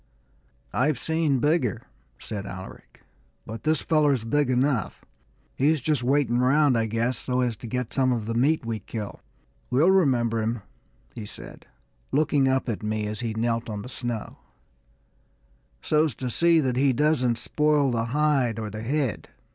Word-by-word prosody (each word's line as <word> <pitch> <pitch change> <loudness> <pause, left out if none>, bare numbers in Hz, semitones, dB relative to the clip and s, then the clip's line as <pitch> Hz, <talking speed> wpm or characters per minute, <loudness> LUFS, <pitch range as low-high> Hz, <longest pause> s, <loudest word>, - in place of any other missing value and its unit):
"I've 135 +2 +1
seen 160 0 0
bigger," 130 -5 +1 0.3
said 100 -2 -6
Alaric, 95 0 -10 0.4
"but 110 0 -7
this 155 +3 +1
feller's 145 -6 +2
big 145 +3 +1
enough. 130 -2 0 0.5
He's 150 +3 +2
just 145 0 0
waiting 125 -2 +2
round, 135 +1 +4
I 115 -1 +1
guess, 115 +3 -1
so 125 0 -1
as 120 -2 0
to 120 - -9
get 125 +1 -3
some 130 -1 +2
of 115 -4 -1
the 115 - -2
meat 135 +4 +2
we 115 -1 -3
kill. 105 -1 -7 0.5
We'll 150 +9 +4
remember 120 -11 +2
him," 110 -1 -2 0.5
he 105 -3 -7
said, - - -11 0.4
looking 145 -1 +2
up 130 0 +1
at 115 -4 -3
me 110 0 -2
as 105 0 -4
he 115 -2 -3
knelt 115 0 -1
on 105 -1 -5
the 125 - -9
snow, 120 -4 -5 1.4
"so's 155 -4 +2
to 125 0 -4
see 170 +5 +4
that 130 -3 -1
he 135 0 +3
doesn't 130 -3 +2
spoil 150 -1 +1
the 115 -1 0
hide 135 -3 +1
or 110 -2 -4
the 105 +1 -6
head." 130 -2 -2
125 Hz, 165 wpm, -25 LUFS, 115-145 Hz, 1.4 s, round